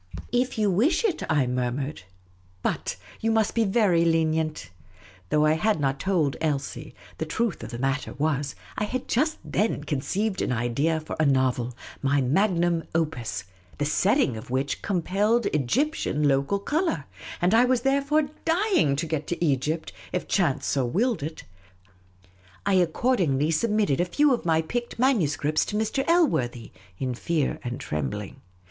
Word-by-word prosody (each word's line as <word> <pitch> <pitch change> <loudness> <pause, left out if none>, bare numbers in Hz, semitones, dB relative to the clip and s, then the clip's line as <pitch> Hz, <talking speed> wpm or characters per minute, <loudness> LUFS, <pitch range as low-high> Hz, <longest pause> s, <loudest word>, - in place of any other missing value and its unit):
" - - -11
If 250 0 0
you 210 -2 +2
wish 275 - +2
it," 360 -7 0
I 145 -4 +3
murmured; 125 +3 -2 0.3
" 90 0 -33
but - - -1
— - - -20
you 225 - +1
must 220 -2 +2
be 230 -1 +2
very 195 -5 +3
lenient! 160 - 0 0.3
" 90 -1 -24
Though 150 0 +3
I 155 - +4
had 210 +4 +1
not 135 -1 0
told 165 -7 +1
Elsie, 145 -4 -3 0.2
the 160 - -1
truth 225 +3 -1
of - - -7
the 120 - -6
matter 135 +3 -1
was, 145 -3 -1 0.2
I 210 - +1
had 255 +4 -4
just 310 +6 +1
then 210 -8 0
conceived 190 +9 -1
an - - 0
idea 125 +7 0
for 155 - -6
a 155 - +3
novel 125 -3 +1
— - - -18
my 140 +1 +2
viagmnn 170 +4 +1
opus 140 - -1 0.2
— 90 -1 -26
the 145 - 0
setting 185 - +2
of 110 - -9
which 135 +2 -1
compelled 205 +4 +1
Egyptian 150 - +1
local 140 +7 +2
colour; 295 - -1 0.3
and 180 +4 +2
I 235 +2 +6
was 250 -1 +2
therefore 280 +3 +2 0.2
dying 345 - +2
to 150 +4 -2
get 155 -2 -3
to 175 0 -1
Egypt, 150 +3 -1 0.2
if 180 - -2
chance 170 -9 +1
so 135 - +1
willed 205 - 0
it. 155 +2 -6 1.2
I 200 - +2
accordingly 170 - +2
submitted 205 -3 +1
a - - +2
few 290 +10 +3
of 240 - -2
my 160 -1 +2
picked 240 +8 -4
manuscripts 155 - +2
to 210 - -4
Mr. 220 +5 0
Elworthy, 130 - +1 0.3
in 130 -1 -2
fear 150 +3 -1
and 120 0 -4
trembling. 75 -4 -4
160 Hz, 170 wpm, -26 LUFS, 135-220 Hz, 1.2 s, I